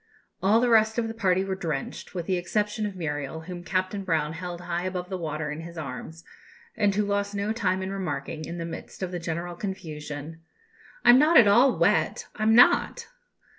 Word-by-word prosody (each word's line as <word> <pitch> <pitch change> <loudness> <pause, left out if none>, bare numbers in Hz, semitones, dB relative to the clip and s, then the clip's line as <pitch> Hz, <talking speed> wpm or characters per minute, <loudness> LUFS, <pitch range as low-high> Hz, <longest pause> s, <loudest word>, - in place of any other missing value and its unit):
All 210 +4 +4
the 245 0 +2
rest 220 -1 +4
of 235 -1 0
the 225 - -5
party 190 -4 +1
were 195 - -2
drenched, 165 -2 -5
with 175 -2 -3
the 185 - 0
exception 210 +4 -1
of 200 - -7
Muriel, 150 -2 -4
whom 175 +1 -8
Captain 185 +2 -2
Brown 160 -4 0
held 175 +1 -6
high 175 0 -3
above 180 -1 -4
the 190 - -2
water 155 -2 -3
in 150 +2 -5
his 170 +1 -10
arms, 160 +3 -7 0.5
and 205 -3 +2
who 210 0 +1
lost 200 0 -1
no 200 +2 -1
time 190 -4 0
in 190 - -4
remarking, 165 -5 -4
in 170 - -6
the 165 - -4
midst 170 +3 -8
of 185 - -3
the 175 - -3
general 170 +1 -4
confusion, 160 -4 -6 0.6
"I'm 245 +2 +8
not 310 +3 +5
at 225 - +8
all 245 +6 +5
wet, - - +2
I'm 220 0 +3
not." 245 - +4
185 Hz, 200 wpm, -26 LUFS, 165-205 Hz, 0.6 s, I'm